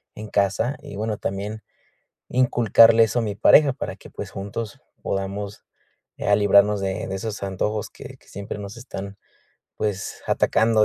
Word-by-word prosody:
en 110 +1 -7
casa 105 +7 +1
y, - - -9
bueno, 105 +1 -2
también 100 +3 -4 0.7
inculcarle 115 -2 +5
eso 110 +2 -1
a - - +1
mi 105 -2 -2
pareja 140 +7 +6
para 140 - -5
que, - - -14
pues, - - -7
juntos 100 +2 -6 0.2
podamos 100 +1 -4 0.5
ya 100 - +3
librarnos 100 0 +4
de 95 +1 -2
de 95 - -3
esos 105 +2 -5
antojos 100 +2 -2
que - - -11
que - - -27
siempre 100 +1 -6
nos 100 0 -7
están, 100 -5 -7 0.6
pues, 100 -2 -3
atacando 110 -1 +3
105 Hz, 155 wpm, -23 LUFS, 100-110 Hz, 0.7 s, pareja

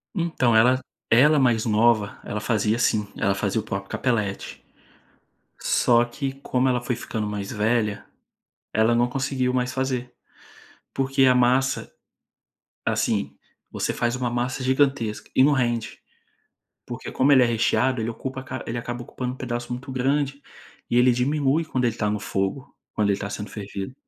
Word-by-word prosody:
Então, 160 -10 +1
ela 125 +3 +5 0.3
ela 145 +5 +5
mais 120 -4 +2
nova, 110 -1 +2
ela 105 - -4
fazia 110 0 +1
assim, 110 -3 +1
ela 100 - +1
fazia 100 +2 -1
o - - -13
próprio 100 0 -5
Capelletti. 105 -6 -2 1.0
Só 120 0 +3
que, 135 +3 -4
como 130 -1 +1
ela 125 -1 +1
foi 120 0 -2
ficando 110 -2 -4
mais 100 -1 -4
velha, 105 -1 0 0.7
ela 110 +2 +3
não 120 +1 +2
conseguiu 130 -1 -1
mais 125 0 0
fazer, 130 -2 -2 0.8
porque 135 0 +2
a 130 - +6
massa 125 +2 +2 0.9
assim, - - 0 0.3
você - - -2
faz 120 +1 0
uma 125 -1 -1
massa 120 +2 -2
gigantesca 130 -4 0
e 130 - +5
não 145 +2 +5
rende, 120 -4 -1 0.9
porque - - -6
como 135 +2 +3
ele 130 -2 +7
é - - +5
recheado 120 +2 +1
ele 110 - -2
ocupa 130 +3 -6 0.2
ele 120 - -3
acaba 120 +1 -5
ocupando 125 +1 -5
um - - -13
pedaço 120 -1 -4
muito 125 +2 -6
grande, 140 +2 0 0.5
e 120 - 0
ele 125 +1 +6
diminui 140 +5 +1
quando 130 -5 -2
ele 115 -2 +1
está 105 -2 -1
no 105 0 -1
fogo; 100 +7 -3 0.2
quando 105 -1 +1
ele 100 - +2
está 100 - -5
sendo 105 +1 -6
fervido. 100 +2 -6
120 Hz, 160 wpm, -24 LUFS, 110-130 Hz, 1.0 s, ele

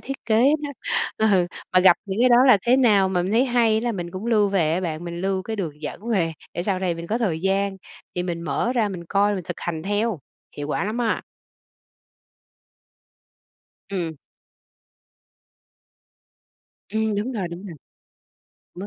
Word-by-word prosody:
thiết 275 +1 -5
kế 220 0 +3 0.2
đó. 290 - -3 0.6
Ừ, 185 -3 +3 0.3
mà 185 - +6
gặp 180 -2 +7
những 195 +4 -2
cái 255 - +6
đó 240 - +6
là 230 - +7
thế 245 +2 +4
nào 210 -7 +4
mà 180 -2 0
mình 190 +4 -2
thấy 240 +3 +4
hay 235 -4 +2
là 235 0 -1
mình 175 -3 -5
cũng 190 +5 -6
lưu 210 -3 +3
về 170 -6 +1
á 175 - 0
bạn, 170 -2 -4
mình 170 0 -5
lưu 190 0 -1
cái 220 +2 -4
đường 155 -6 -5
dẫn 200 +9 -6
về 175 -8 +1 0.2
để 175 - -2
sau 190 -1 0
này 185 -2 -1
mình 170 0 -7
có 225 +5 -1
thời 175 -9 -1
gian 195 +1 0 0.4
thì 180 - -1
mình 175 -2 -3
mở 160 - -1
ra 230 -5 +1
mình 175 -3 -6
coi, 200 +3 +2
mình 185 - -5
thực - - -6
hành 160 -2 -3
theo. 205 -1 0 0.4
Hiệu 145 0 -5
quả - - -1
lắm 220 +4 -3
á! 235 -2 0 2.7
Ừm. 170 -5 -3 2.7
Ừm, 220 0 0
đúng 220 +6 -2
rồi, 200 -7 -2
đúng 170 +4 -8
rồi. 175 - -8 1.0
Mất 185 +3 -6
195 Hz, 180 wpm, -23 LUFS, 175-220 Hz, 2.7 s, gặp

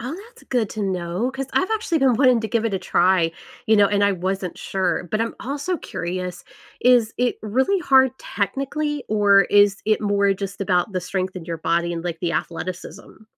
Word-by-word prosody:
Oh, 255 +7 -5
that's - - -20
good 235 -5 -1
to 215 - -4
know. 185 +5 -2
'Cause 270 0 -5
I've 375 - +1
actually 365 -7 -1
been 265 -3 +3
wanting 255 -2 +4
to 220 - -4
give 230 +1 0
it 215 -4 -1
a - - 0
try, 175 -2 +2 0.3
you 220 - +4
know, 205 -1 +6
and 205 0 +1
I 200 - +3
wasn't 185 0 -3
sure, 180 -2 -2
but 215 - 0
I'm 230 - -2
also 285 +7 -3
curious, 180 - -5 0.4
is 240 -3 +4
it 245 0 0
really 265 - +1
hard 265 -6 +4
technically, 275 +8 -3
or 205 -2 +5
is 205 -1 +3
it 215 0 +2
more 200 -1 +2
just 200 +1 -6
about 185 +1 +1
the 185 - -1
strength 185 +1 -3
in 175 -3 -7
your 165 -1 -4
body 170 +2 0
and, 170 0 -5
like, 170 -2 -4
the 170 -1 -1
athleticism? 180 +5 -6
205 Hz, 200 wpm, -22 LUFS, 185-245 Hz, 0.4 s, know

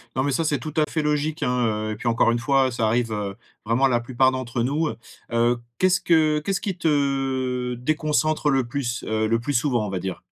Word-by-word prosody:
Non, 130 - +1
mais 145 - 0
ça, 165 +5 0
c'est 150 -2 +1
tout 155 -2 -7
à 155 - +4
fait 160 - -1
logique, 150 +1 -1
hein, 115 -4 0
heu - - -2
et - - -5
puis 120 - -8
encore 115 0 +3
une 120 - 0
fois, 135 +2 +2
ça 115 -2 -1
arrive, 115 0 +1
heu, 100 -2 -3 0.3
vraiment, 120 +5 +2
à - - +4
la 120 -2 +2
plupart 130 +2 +2
d'entre 130 -2 -3
nous, 150 +5 0
heu 115 - -5 0.4
heu 120 +1 +3 0.2
qu'est-ce 185 0 +3
que 155 -2 +3
qu'est-ce 195 +4 -2
qui 195 -4 -3
te 135 -5 0
déconcentre 155 +3 0
le 135 -2 +2
plus, 120 -2 -3
heu, 110 0 0
le 115 +1 +2
plus 145 +4 -3
souvent, 120 -4 +1
on - - -5
va 95 - -3
dire? 95 0 -5
130 Hz, 240 wpm, -23 LUFS, 115-150 Hz, 0.4 s, à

